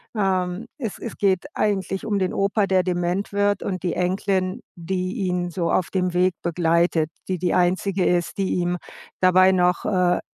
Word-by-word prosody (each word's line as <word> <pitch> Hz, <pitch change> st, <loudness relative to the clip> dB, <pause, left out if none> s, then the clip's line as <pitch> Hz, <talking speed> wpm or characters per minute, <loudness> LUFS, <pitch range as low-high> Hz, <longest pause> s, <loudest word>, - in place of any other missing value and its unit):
Ähm, 190 Hz, 0 st, 0 dB
es 230 Hz, -8 st, -5 dB
es 235 Hz, -, -6 dB
geht 190 Hz, -3 st, +1 dB
eigentlich 195 Hz, -2 st, -1 dB
um 205 Hz, -3 st, 0 dB
den 185 Hz, -1 st, -1 dB
Opa, 200 Hz, +1 st, +1 dB
der 185 Hz, -1 st, +3 dB
dement 180 Hz, +2 st, -1 dB
wird 205 Hz, 0 st, +1 dB
und 185 Hz, -2 st, -3 dB
die 175 Hz, -, 0 dB
Enkelin, 185 Hz, +1 st, 0 dB, 0.2 s
die 185 Hz, +2 st, -3 dB
ihn 180 Hz, -1 st, -1 dB
so 170 Hz, -1 st, -1 dB
auf 185 Hz, -, +1 dB
dem 185 Hz, -2 st, 0 dB
Weg 180 Hz, 0 st, +3 dB
begleitet, 170 Hz, -1 st, +1 dB, 0.2 s
die, 185 Hz, -, 0 dB
die 175 Hz, 0 st, 0 dB
Einzige 185 Hz, +1 st, +1 dB
ist, 175 Hz, +1 st, 0 dB
die 195 Hz, -1 st, 0 dB
ihm 180 Hz, 0 st, 0 dB, 0.4 s
dabei 185 Hz, +1 st, +6 dB
noch, 180 Hz, -1 st, +2 dB
äh, 180 Hz, -4 st, +2 dB
185 Hz, 175 wpm, -23 LUFS, 180-195 Hz, 0.4 s, dabei